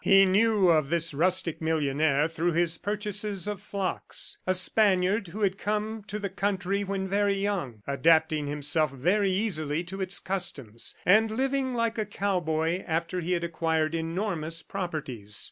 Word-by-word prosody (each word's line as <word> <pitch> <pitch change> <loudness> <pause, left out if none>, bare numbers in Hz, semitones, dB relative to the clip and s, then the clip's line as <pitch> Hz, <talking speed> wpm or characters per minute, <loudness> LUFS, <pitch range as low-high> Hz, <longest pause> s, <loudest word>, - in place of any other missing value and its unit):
He 195 0 +7
knew 200 0 +4
of 155 -4 +3
this 165 -1 +1
rustic 175 +2 0
millionaire 150 -2 +1
through 165 +1 -1
his 170 0 +1
purchases 205 -1 -3
of 205 -2 -4
flocks 195 -2 -4
a 185 - +3
Spaniard 195 +1 +2
who 205 +6 -7
had 195 -1 +1
come 215 +1 -2
to 210 - -3
the 205 -1 -3
country 195 0 -1
when 195 -1 -2
very 200 +1 +2
young, 185 - -2
adapting 155 +2 +3
himself 150 +2 +1
very 180 +10 +1
easily 170 -6 0
to 190 +3 -6
its 185 -1 -1
customs, 140 - -3
and 215 +4 +5
living 260 +2 0
like 230 -1 0
a 215 - -1
cowboy 175 -4 -1
after 165 +2 -1
he 175 +2 -1
had 170 -1 -1
acquired 160 -1 0
enormous 165 -1 -2
properties. 140 - -4
180 Hz, 155 wpm, -27 LUFS, 160-200 Hz, -, He